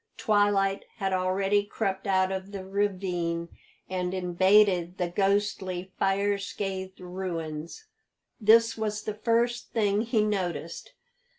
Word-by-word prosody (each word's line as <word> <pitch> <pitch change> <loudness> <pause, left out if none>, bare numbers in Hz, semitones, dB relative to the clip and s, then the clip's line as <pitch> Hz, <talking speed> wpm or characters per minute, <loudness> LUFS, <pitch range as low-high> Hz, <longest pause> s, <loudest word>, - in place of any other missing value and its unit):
Twilight 205 -2 +2
had 195 -4 -2
already 195 +2 +1
crept 195 -1 -3
out 190 -1 +2
of 190 +1 -4
the 195 -2 -6
ravine 180 -4 -1 0.4
and 185 0 -2
invaded 185 0 +3
the 180 - 0
ghostly, 195 -1 0
fire 200 +1 +1
scathed 190 -1 -5
ruins. 175 - -5 0.5
This 230 +1 +5
was 215 -1 -3
the 215 - -3
first 235 +3 0
thing 205 -2 +2
he 225 -2 +1
noticed. 175 -7 -3
195 Hz, 115 wpm, -27 LUFS, 185-205 Hz, 0.5 s, This